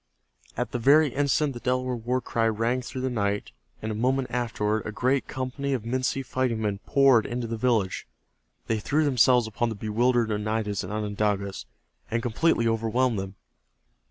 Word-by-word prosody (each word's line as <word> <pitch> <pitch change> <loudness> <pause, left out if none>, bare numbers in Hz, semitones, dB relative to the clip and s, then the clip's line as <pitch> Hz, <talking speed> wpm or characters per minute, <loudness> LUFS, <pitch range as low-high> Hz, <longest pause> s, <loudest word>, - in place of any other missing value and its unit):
At - - -2
that 120 - -2
very 145 +5 +5
instant 145 +1 +1
the 120 - -7
Delaware 130 +1 -1
war 125 +2 -1
cry 115 -1 0
rang 115 +3 0
through 130 +1 -6
the 130 - 0
night 100 - -1 0.3
and 110 - -2
a - - -2
moment 130 +3 0
afterward 110 -3 -1
a - - -3
great 130 +5 0
company 135 +2 -3
of 125 -5 -2
Minsi 130 +2 -1
fighting 130 -3 -1
men 105 -2 -1
poured 135 -5 +4
into 120 0 -3
the 115 0 -3
village. 110 -5 0 0.6
They 110 -1 0
threw 150 +8 +1
themselves 125 -3 +4
upon 110 +2 -1
the 110 - -4
bewildered 115 +3 +1
Oneidas 105 -1 -1
and 90 - -6
Onondagas 105 -2 -2 0.4
and 115 0 -1
completely 120 0 +2
overwhelmed 115 +1 +1
them. 95 0 -6
115 Hz, 170 wpm, -26 LUFS, 110-130 Hz, 0.6 s, very